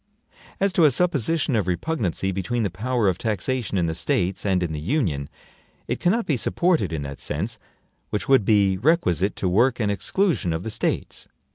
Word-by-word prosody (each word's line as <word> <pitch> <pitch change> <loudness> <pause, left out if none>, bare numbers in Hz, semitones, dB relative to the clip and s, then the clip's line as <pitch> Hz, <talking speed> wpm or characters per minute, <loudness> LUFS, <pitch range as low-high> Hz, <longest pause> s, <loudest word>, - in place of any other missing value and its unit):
As 195 -1 +1
to 170 - +5
a - - +7
supposition 155 -2 +1
of 105 -5 0
repugnancy 95 - -1
between 110 +5 -2
the 100 - -1
power 115 +4 0
of 90 -2 0
taxation 110 +1 -2
in 90 - +2
the 80 - -1
States 90 +4 -1
and 95 -2 +2
in 85 - -2
the 75 - -4
Union, 80 - -1 0.6
it - - -2
cannot 220 +6 +1
be 145 - 0
supported 160 - +1
in 80 -3 -3
that 70 0 -7
sense - - -3 0.5
which 105 - -3
would 135 -5 +5
be 100 -2 +3
requisite 105 - +2
to 95 - -2
work 120 +8 +2
an 105 -3 +1
exclusion 135 - 0
of 80 +2 -3
the 110 - -4
States. - - -3
105 Hz, 185 wpm, -23 LUFS, 90-135 Hz, 0.6 s, a